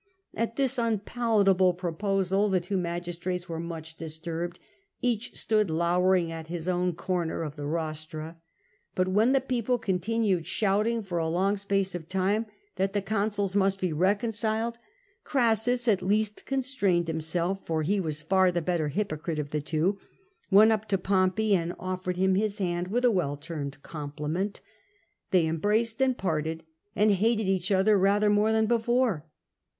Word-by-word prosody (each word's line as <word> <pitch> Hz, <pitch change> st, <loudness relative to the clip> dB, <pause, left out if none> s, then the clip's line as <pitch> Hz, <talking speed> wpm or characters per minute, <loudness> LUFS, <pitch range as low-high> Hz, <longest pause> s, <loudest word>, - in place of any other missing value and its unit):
At 230 Hz, +1 st, -2 dB
this 265 Hz, -3 st, +1 dB
unpalatable 210 Hz, -4 st, +2 dB
pro 175 Hz, -2 st, -3 dB
posal, 195 Hz, +2 st, +1 dB
the 190 Hz, -1 st, +2 dB
two 180 Hz, +3 st, -4 dB
magistrates 175 Hz, 0 st, -3 dB
were 165 Hz, -1 st, -4 dB
much 165 Hz, -1 st, -7 dB
disturbed: 165 Hz, +2 st, -5 dB, 0.4 s
each 240 Hz, -2 st, -1 dB
stood 215 Hz, -4 st, +1 dB
lowering 175 Hz, +1 st, +2 dB
at 165 Hz, -1 st, -7 dB
his 170 Hz, 0 st, -5 dB
own 180 Hz, 0 st, +1 dB
corner 170 Hz, -1 st, -2 dB
of 150 Hz, -2 st, -6 dB
the 145 Hz, -1 st, -5 dB
rostra. 155 Hz, 0 st, -4 dB, 0.6 s
But 185 Hz, 0 st, +1 dB
when 215 Hz, +6 st, +3 dB
the 270 Hz, -, +4 dB
people 250 Hz, -2 st, 0 dB
continued 195 Hz, -3 st, 0 dB
shouting 215 Hz, +4 st, +1 dB
for 175 Hz, -3 st, -3 dB
a 165 Hz, -, 0 dB
long 190 Hz, +5 st, +1 dB
space 195 Hz, -1 st, -1 dB
of 170 Hz, -2 st, -7 dB
time 195 Hz, +4 st, 0 dB, 0.3 s
that 195 Hz, +1 st, 0 dB
the 205 Hz, -, +1 dB
consuls 200 Hz, -1 st, -1 dB
must 195 Hz, -1 st, +2 dB
be 180 Hz, -4 st, -1 dB
reconciled, 220 Hz, +5 st, 0 dB, 0.4 s
Orassus 245 Hz, -1 st, +2 dB
at 200 Hz, -4 st, +3 dB
last 210 Hz, +2 st, 0 dB
con 270 Hz, -1 st, 0 dB
strained 195 Hz, -10 st, +1 dB
himself 170 Hz, +4 st, -1 dB, 0.2 s
— 155 Hz, -, 0 dB
he 200 Hz, +6 st, +1 dB
was 155 Hz, -4 st, -3 dB
far 185 Hz, +2 st, +3 dB
the 175 Hz, -, 0 dB
better 170 Hz, -2 st, -1 dB
hypocrite 155 Hz, -1 st, -3 dB
of 145 Hz, -1 st, -4 dB
the 150 Hz, -, -1 dB
two 165 Hz, +7 st, 0 dB, 0.2 s
— 385 Hz, -1 st, -38 dB
went 210 Hz, +3 st, +7 dB
up 220 Hz, 0 st, -1 dB
to 195 Hz, -, +1 dB
Pompey 190 Hz, +3 st, +2 dB
and 170 Hz, -1 st, -2 dB
offered 185 Hz, -1 st, -3 dB
him 190 Hz, +1 st, +3 dB
his 205 Hz, +1 st, 0 dB
hand 175 Hz, -3 st, -1 dB
with 245 Hz, +6 st, 0 dB
a 245 Hz, -, +5 dB
well 150 Hz, -8 st, 0 dB
turned 145 Hz, -2 st, -6 dB
compliment. 150 Hz, +6 st, -4 dB, 0.7 s
They 180 Hz, -3 st, +3 dB
embraced, 215 Hz, +9 st, 0 dB, 0.2 s
parted, 160 Hz, -2 st, -2 dB, 0.3 s
and 210 Hz, +1 st, +4 dB
hated 215 Hz, +2 st, +2 dB
each 190 Hz, 0 st, 0 dB
other 195 Hz, +2 st, +4 dB
rather 205 Hz, +2 st, +3 dB
more 210 Hz, +1 st, +3 dB
than 220 Hz, 0 st, +3 dB
before. 235 Hz, -, +1 dB
190 Hz, 165 wpm, -27 LUFS, 170-215 Hz, 0.7 s, went